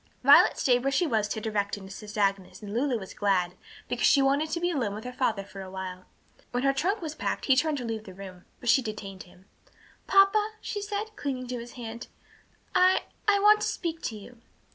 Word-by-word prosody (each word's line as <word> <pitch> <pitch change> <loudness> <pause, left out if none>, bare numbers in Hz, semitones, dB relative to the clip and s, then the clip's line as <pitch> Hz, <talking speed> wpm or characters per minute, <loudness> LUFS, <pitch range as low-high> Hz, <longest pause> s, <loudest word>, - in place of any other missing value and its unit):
Violet - - +7
stayed 245 -2 +3
where 275 - +2
she 345 +6 +2
was 220 -8 +1
to 220 - -3
direct 210 -2 -2
and 190 -1 -10
assist 205 +2 -9
Agnes, 195 -1 -1
and 205 0 -6
Lulu 250 +1 +1
was 190 -3 -9
glad, 185 -3 +1 0.3
because - - +1
she 280 - +5
wanted 280 +3 +2
to 340 - -2
be 350 +1 0
alone 235 -10 -1
with 215 - -7
her 250 - -6
father 225 -6 0
for 195 0 -10
a 190 - -8
while. 185 -1 -7 0.4
When 245 +1 -2
her 275 0 +3
trunk 370 +7 -1
was 310 -2 -4
packed - - -3
he 265 - +5
turned 300 +2 +1
to 250 - -5
leave 220 -1 -4
the 190 - -11
room, 185 -2 -10
but 245 - -3
she 265 - +5
detained 205 -4 -7
him. 180 +1 -20 0.6
"Papa," 415 +2 +4
she 410 - -4
said, 420 +1 -4
clinging 265 -7 -3
to 250 -1 -3
his 235 +1 -9
hand, 235 -1 -7 0.7
"I 370 -1 +4 0.2
I 410 -1 +5
want 425 +1 +6
to - - 0
speak 330 -2 -3
to 220 - -3
you." 230 +3 -13
245 Hz, 225 wpm, -27 LUFS, 200-315 Hz, 0.7 s, Violet